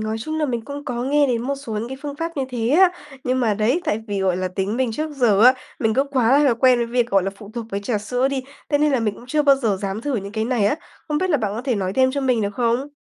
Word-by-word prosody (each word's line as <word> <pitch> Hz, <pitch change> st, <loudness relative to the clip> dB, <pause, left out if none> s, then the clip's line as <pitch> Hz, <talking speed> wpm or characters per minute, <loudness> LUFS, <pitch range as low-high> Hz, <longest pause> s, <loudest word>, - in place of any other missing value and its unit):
nói 215 Hz, +1 st, -2 dB
chung 310 Hz, +7 st, -4 dB
là 305 Hz, -, +1 dB
mình 240 Hz, -4 st, -2 dB
cũng 285 Hz, +1 st, -7 dB
có 240 Hz, -3 st, -3 dB
nghe 290 Hz, +2 st, +3 dB
đến 240 Hz, -3 st, 0 dB
một 275 Hz, +3 st, -1 dB
số 275 Hz, -4 st, -8 dB
những 215 Hz, +3 st, -3 dB
cái 265 Hz, -, -6 dB
phương 290 Hz, -1 st, -5 dB
pháp 330 Hz, +1 st, -4 dB
như 275 Hz, -, 0 dB
thế 235 Hz, -2 st, -2 dB
á. 360 Hz, +5 st, +6 dB, 0.3 s
Nhưng 255 Hz, +1 st, +1 dB
mà 225 Hz, -4 st, +2 dB
đấy, 225 Hz, -, +1 dB
tại 210 Hz, -, 0 dB
vì, 200 Hz, -1 st, -2 dB
gọi 185 Hz, -2 st, +1 dB
là, 185 Hz, 0 st, -2 dB
tính 190 Hz, +4 st, -2 dB
mình 255 Hz, -3 st, 0 dB
trước 310 Hz, +6 st, -3 dB
giờ 240 Hz, -8 st, +3 dB
á, 255 Hz, +1 st, +8 dB, 0.3 s
mình 220 Hz, -1 st, +1 dB
cứ 270 Hz, -, +3 dB
quá 265 Hz, -2 st, +3 dB
là 270 Hz, -5 st, +4 dB
quen 250 Hz, +1 st, +4 dB
với 235 Hz, -, 0 dB
việc, 240 Hz, 0 st, 0 dB
gọi 195 Hz, -1 st, +3 dB
là, 195 Hz, -, -2 dB
phụ 205 Hz, 0 st, -12 dB
thuộc 235 Hz, -2 st, -5 dB
với 200 Hz, -, -2 dB
trà 210 Hz, +1 st, -1 dB
sữa 245 Hz, +5 st, 0 dB
đi, 275 Hz, -1 st, -2 dB, 0.3 s
thế 290 Hz, -, +2 dB
nên 300 Hz, 0 st, +2 dB
là 260 Hz, -, +2 dB
mình 210 Hz, -2 st, -1 dB
cũng 240 Hz, -, -14 dB
chưa 300 Hz, +4 st, +1 dB
bao 280 Hz, -2 st, +5 dB
giờ 225 Hz, -7 st, 0 dB
dám 195 Hz, +1 st, -3 dB
thử 275 Hz, +1 st, -2 dB
những 200 Hz, -1 st, -5 dB
cái 220 Hz, 0 st, -1 dB
này 235 Hz, -4 st, +1 dB
á. 210 Hz, -, +1 dB, 0.3 s
Không 300 Hz, -1 st, 0 dB
biết 370 Hz, +1 st, 0 dB
là 300 Hz, -, +4 dB
bạn 215 Hz, -6 st, -2 dB
có 230 Hz, -, -4 dB
thể 255 Hz, -3 st, 0 dB
nói 190 Hz, -3 st, -2 dB
thêm 260 Hz, +3 st, +3 dB
cho 280 Hz, +1 st, -2 dB
mình 250 Hz, -4 st, +1 dB
được 200 Hz, 0 st, -2 dB
không? 240 Hz, +4 st, 0 dB
245 Hz, 320 wpm, -21 LUFS, 215-275 Hz, 0.3 s, á